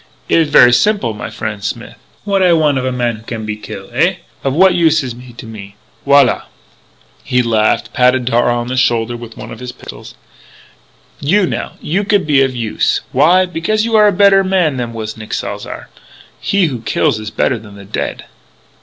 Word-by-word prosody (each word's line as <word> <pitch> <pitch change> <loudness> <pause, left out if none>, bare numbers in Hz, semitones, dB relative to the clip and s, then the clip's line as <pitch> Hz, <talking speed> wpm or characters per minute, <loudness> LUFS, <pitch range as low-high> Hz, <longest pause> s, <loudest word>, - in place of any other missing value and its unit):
It - - +3
is 160 -2 +1
ver' 125 -4 +7
simple, 125 - +2
my 105 - -6
frien' 110 -2 -5
Smith. 100 - -5 0.3
What 200 -1 0
I 180 -2 +4
want 150 -4 +2
of 130 - -3
a 130 - -1
man 120 -2 -1
who - - -14
can 110 -1 -6
be 105 0 -3
kill? 105 - -9
Eh? - - +2 0.3
Of 135 - 0
what 185 +6 +4
use 160 -3 +3
is 125 -2 -5
he 125 +1 -13
to 120 - -11
me? 100 -3 -10 0.3
Voilà!" 140 -1 +4 0.8
He 125 0 +1
laughed, 110 -2 +1
patted 125 -1 +2
Darragh 120 0 +2
on - - -5
the 130 +1 -3
shoulder 120 -2 +1
with 115 -1 -10
one - - -9
of - - -9
his 125 0 -6
pistols. - - -12 1.0
"You, 190 +7 +2
now - - -4
you 190 +6 -1
could 205 -1 +1
be 145 -3 +3
of 135 -1 0
use. 115 -3 0
Why? 170 +8 +4
Because 180 +6 -1
you 230 -1 0
are 210 -1 +6
a - - +4
better 195 0 +4
man 180 -7 +1
than 120 -2 -3
was 110 -1 -6
Nick 110 -1 -5
Salzar. - - -6 0.5
He 200 -2 +1
who 130 -8 -3
kills 110 - 0
is 110 0 -6
better 120 +2 0
than 105 -2 -14
the 100 -1 -12
dead." - - -4
130 Hz, 205 wpm, -15 LUFS, 115-170 Hz, 1.0 s, ver